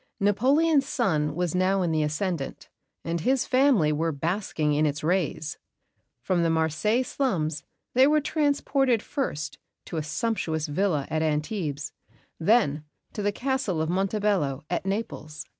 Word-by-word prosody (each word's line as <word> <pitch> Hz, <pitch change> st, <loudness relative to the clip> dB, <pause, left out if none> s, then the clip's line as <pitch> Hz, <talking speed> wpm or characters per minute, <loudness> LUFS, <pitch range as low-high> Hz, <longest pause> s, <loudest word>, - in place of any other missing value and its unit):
Napoleon's 275 Hz, +9 st, +3 dB
sun 160 Hz, -, 0 dB
was 175 Hz, -2 st, -1 dB
now 185 Hz, +1 st, +2 dB
in 170 Hz, -, 0 dB
the 155 Hz, -1 st, +1 dB
ascendant, 155 Hz, 0 st, -3 dB, 0.4 s
and 170 Hz, 0 st, -2 dB
his 260 Hz, +6 st, +2 dB
family 255 Hz, -, +4 dB
were 160 Hz, +2 st, 0 dB
basking 160 Hz, 0 st, -1 dB
in 150 Hz, +1 st, +3 dB
its 145 Hz, +1 st, -3 dB
rays. 165 Hz, -2 st, -1 dB, 0.6 s
From 185 Hz, -2 st, +1 dB
the 165 Hz, -, +2 dB
Marseilles 165 Hz, +10 st, +1 dB
slums 160 Hz, -, -1 dB, 0.3 s
they 260 Hz, +2 st, +6 dB
were 305 Hz, +1 st, +4 dB
transported 280 Hz, -5 st, +1 dB
first 155 Hz, -, -3 dB, 0.3 s
to 170 Hz, -, -5 dB
a -, -, 0 dB
sumptuous 160 Hz, -3 st, -1 dB
villa 155 Hz, -2 st, 0 dB
at 155 Hz, 0 st, 0 dB
Antibes; 150 Hz, -2 st, -2 dB, 0.5 s
then 165 Hz, -6 st, +3 dB, 0.3 s
to 210 Hz, -, -4 dB
the 205 Hz, 0 st, +1 dB
Castle 255 Hz, -7 st, -1 dB
of 160 Hz, +1 st, 0 dB
Montebello, 195 Hz, -7 st, 0 dB
at 180 Hz, +2 st, -1 dB
Naples. 155 Hz, -7 st, -4 dB
180 Hz, 140 wpm, -26 LUFS, 155-230 Hz, 0.6 s, they